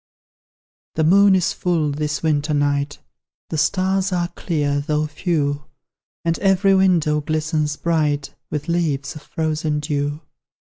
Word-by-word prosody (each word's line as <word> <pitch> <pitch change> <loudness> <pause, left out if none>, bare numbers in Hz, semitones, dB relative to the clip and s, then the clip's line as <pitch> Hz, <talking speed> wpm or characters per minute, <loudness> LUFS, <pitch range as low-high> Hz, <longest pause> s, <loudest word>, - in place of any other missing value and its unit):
The 160 - +1
moon 195 +4 +6
is 180 -2 +1
full 165 -5 0
this 150 +1 -2
winter 150 -1 +1
night; 145 0 0 0.5
The 160 - -1
stars 190 +3 +1
are 175 -1 0
clear, 150 -5 -1
though 150 +1 0
few; 150 -2 -1 0.6
And 165 0 +1
every 195 0 +3
window 170 -6 +3
glistens 155 0 -1
bright 150 -4 0 0.2
With 150 -1 -4
leaves 160 -5 -1
of 150 - -9
frozen 155 -2 -2
dew. 145 0 -2
155 Hz, 130 wpm, -21 LUFS, 150-175 Hz, 0.6 s, moon